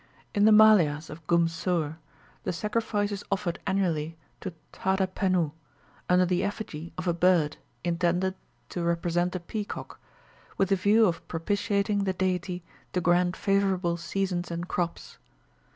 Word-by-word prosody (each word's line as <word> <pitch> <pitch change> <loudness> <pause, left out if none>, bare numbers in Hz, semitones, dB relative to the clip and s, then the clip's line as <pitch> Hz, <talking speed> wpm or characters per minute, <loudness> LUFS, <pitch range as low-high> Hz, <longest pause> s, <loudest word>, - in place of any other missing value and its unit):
In 205 -1 +4
the 220 - +7
Maliahs 180 -9 +6
of 155 +1 -11
Goomsur, 165 -2 +1 0.5
the - - -1
sacrifice 210 +2 -1
is 200 0 -4
offered 190 -3 -1
annually 165 -5 0 0.2
to 190 - -5 0.2
Thadha 190 0 +1
Pennoo, 185 -4 0 0.6
under 180 0 +5
the 180 0 +1
effigy 170 -6 -4
of 180 0 -4
a 175 - +3
bird 170 -3 +3 0.3
intended 175 +2 +1 0.4
to 175 - -4
represent 170 +1 0
a - - -1
peacock, 205 +4 -6 0.6
with 195 - +2
the 195 - +4
view 205 +4 +4
of 165 -4 -1
propitiating 200 +3 0
the 190 - +1
deity 180 -1 -1 0.3
to 180 - +1
grant 175 0 +2
favourable 195 -3 +1
seasons 180 0 -2
and 170 +1 -4
crops. 175 -2 -3
180 Hz, 140 wpm, -28 LUFS, 170-195 Hz, 0.6 s, the